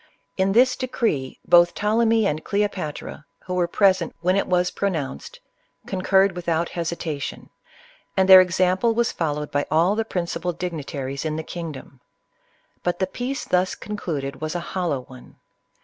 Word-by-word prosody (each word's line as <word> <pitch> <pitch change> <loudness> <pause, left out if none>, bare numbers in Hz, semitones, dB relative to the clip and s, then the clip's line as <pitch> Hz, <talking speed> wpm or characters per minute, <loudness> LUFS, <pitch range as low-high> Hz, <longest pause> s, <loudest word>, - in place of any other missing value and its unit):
In 190 0 +1
this 250 +3 +5
decree, 225 - -2
both 175 0 +5
Ptolemy 225 +1 +2
and 155 -4 -1
Cleopatra, 200 -8 -3 0.2
who 180 - -4
were 180 -1 +1
present 185 -2 +2
when 180 +2 +2
it 195 - +1
was 180 -1 +1
pronounced, 155 - -3 0.5
concurred 190 0 +2
with 175 -1 -4
out 165 +1 +1
hesitation; 165 -4 -4 0.7
and 190 0 +4
their 190 -1 +11
example 185 +5 +2
was 235 0 +1
followed 150 -2 -3
by 145 0 0
all 165 +5 +3
the 225 - 0
principal 180 -3 -3
dignitaries 145 -6 -4
in 155 -1 -2
the 160 - -4
kingdom. 155 -6 -8 0.8
But 175 - -1
the 190 - +1
peace 255 +9 -4
thus 185 +1 +1
concluded 155 -10 -5
was 155 +2 -3
a - - 0
hollow 175 -8 -1
one. 125 0 -15
180 Hz, 150 wpm, -23 LUFS, 155-195 Hz, 0.8 s, their